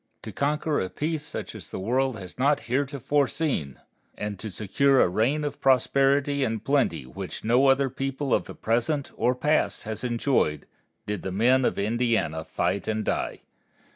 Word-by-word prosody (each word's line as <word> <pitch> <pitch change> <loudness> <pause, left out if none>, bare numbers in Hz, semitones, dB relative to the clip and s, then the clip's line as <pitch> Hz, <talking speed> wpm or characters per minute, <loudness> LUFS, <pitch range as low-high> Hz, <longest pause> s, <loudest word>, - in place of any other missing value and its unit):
To - - -6
conquer 150 +1 0
a 95 - -3
peace 150 - -2
such - - -6
as - - -10
the - - -6
world 125 +4 0
has 95 +2 -10
not 140 +2 +3
heretofore 140 +2 0
seen, 125 - -2 0.4
and 105 -2 -4
to 110 - -5
secure 130 +8 +2
a - - +5
reign 120 +11 +1
of 145 -1 -4
prosperity 140 +2 +3
and 110 -4 -2
plenty 130 - +1
which 65 - -7
no 125 +5 +4
other 135 +1 +4
people 135 +1 -2
of - - +2
the - - -9
present 120 +6 0
or 125 - +2
the - - -22
past 150 +1 +1
has 110 +2 -5
enjoyed, 120 - 0 0.4
did 105 -2 -3
the 95 - -4
men 125 +6 +3
of - - 0
Indiana 110 -7 0
fight 100 - -2
and 110 0 -1
die. - - -2
125 Hz, 175 wpm, -26 LUFS, 110-140 Hz, 0.4 s, a